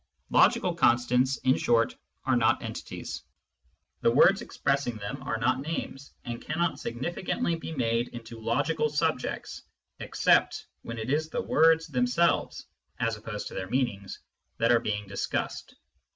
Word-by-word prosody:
" - - -46
Logical - - +4
constants," 125 +2 +3
in 130 0 +4
short, 115 -1 +2 0.3
are - - +3
not - - +2
entities; - - -6 0.8
the - - +4
words 185 - +5
expressing 140 - -1
them 110 +7 -6
are 135 -4 -2
not 125 +3 +1
names, 140 -3 -5
and 120 -1 -5
cannot 170 +2 -1
significantly 170 - -2
be 165 - -7
made 120 -4 0
into 115 -1 -9
logical 120 +8 0
subjects 150 -2 -2 0.4
except - - +2 0.2
when 115 - -7
it 110 +3 -3
is 155 +2 0
the - - -2
words 160 +1 +4
themselves, 135 +3 +1 0.3
as 115 -1 0
opposed 105 0 -6
to - - -12
their 95 - -5
meanings, 120 -7 -2 0.4
that 115 +1 +3
are 120 - +5
being 105 -2 -3
discussed. 100 0 -3
125 Hz, 145 wpm, -28 LUFS, 115-150 Hz, 0.8 s, words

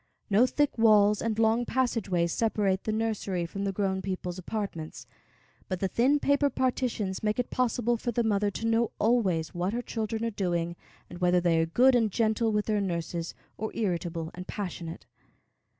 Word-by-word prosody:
No 220 +6 +5
thick 290 -3 0
walls 210 -2 +5
and 220 -2 -1
long 225 +1 +3
passageways 215 -10 0
separate 205 -4 0
the 215 - 0
nursery 215 -5 -1
from 195 +4 -4
the 195 - 0
grown 190 -1 -1
people's 185 -1 -4
apartments, 185 -5 -5 0.6
but 185 -2 -2
the 195 - 0
thin 260 +9 +2
paper 285 0 +2
partitions 245 -7 -1
make 210 0 0
it 250 - -2
possible 240 -1 +1
for 240 +2 -2
the 235 +1 0
mother 205 -2 +1
to 215 +3 -5
know 225 0 +2
always 195 -8 +1
what 180 +3 -1
her 240 - -1
children 225 0 -3
are 230 - -1
doing, 175 -4 -1 0.3
and 175 - -10
whether 180 0 +3
they 170 -2 +2
are 165 - +1
good 255 +10 +5
and 230 -3 +3
gentle 220 +1 +1
with 210 -1 0
their 210 -2 +1
nurses, 170 -2 -3 0.2
or 220 +1 -3
irritable 170 -5 -2
and 180 +1 -8
passionate. 175 -5 -6
210 Hz, 180 wpm, -28 LUFS, 180-230 Hz, 0.6 s, No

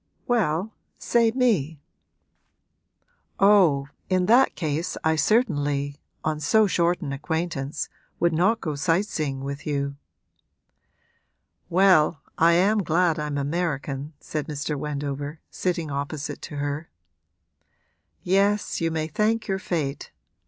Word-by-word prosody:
'Well, 205 -3 0 0.2
say 235 -1 +2
me.' 210 - +1 1.6
'Oh, 180 -9 +5 0.2
in 185 -1 +2
that 245 +6 +5
case 160 +1 -2
I 160 0 +3
certainly 145 - +1 0.2
on 155 -1 -1
so 215 +8 +4
short 175 -2 +1
an 140 -5 -4
acquaintance 150 -1 -3 0.3
would 170 -1 +2
not 185 +8 +2
go 155 - -2
sight 165 +6 +1
seeing 145 -9 -3
with 140 +1 -6
you.' 140 -1 -2 1.7
'Well, 175 -5 +4
I 170 +1 +5
am 200 +5 +3
glad 170 -2 +2
I'm 150 -1 -2
American,' 145 -1 -2
said 150 -2 -4
Mr. 150 0 -3
Wendover, 145 +1 -4
sitting 170 -4 -2
opposite 140 +1 -4
to 150 - -8
her. 145 +2 -3 1.3
'Yes, 200 +2 +1
you 165 - +1
may 160 -1 -1
thank 215 +7 0
your 195 -1 -1
fate. 150 -7 -3
160 Hz, 115 wpm, -25 LUFS, 145-185 Hz, 1.7 s, Oh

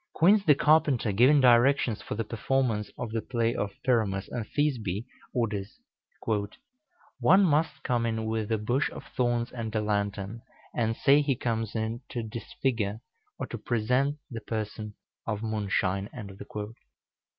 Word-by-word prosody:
Quince 195 +5 +5
the 150 - +6
carpenter, 140 -7 +3
giving 130 +8 +5
directions 125 -1 +4
for - - -5
the 115 - -1
performance 115 -1 0
of 110 - -4
the 115 0 -1
play 115 -1 0
of 105 -4 -1
"Pyramus 105 -6 +1
and 115 -3 -4
Thisbe," 120 -9 -1 0.3
orders: 105 -4 -2 1.4
"One 195 +2 +6
must 160 -1 +1
come 120 -2 +1
in 110 -1 -2
with 110 -1 -2
a 110 - +3
bush 120 +6 0
of - - -9
thorns 120 -1 +1
and 115 -2 -5
a - - +3
lantern, 100 +1 -2 0.3
and 115 -1 0
say 145 +1 +5
he 140 -2 +1
comes 115 -3 -2
in 110 +2 -2
to 120 - -3
disfigure, 110 -1 -2 0.4
or - - -3
to - - -7
present, 125 +5 +1
the 115 -2 -5
person 105 -1 -4 0.3
of 110 -1 -2
Moonshine." 100 -3 -1
115 Hz, 145 wpm, -28 LUFS, 105-125 Hz, 1.4 s, the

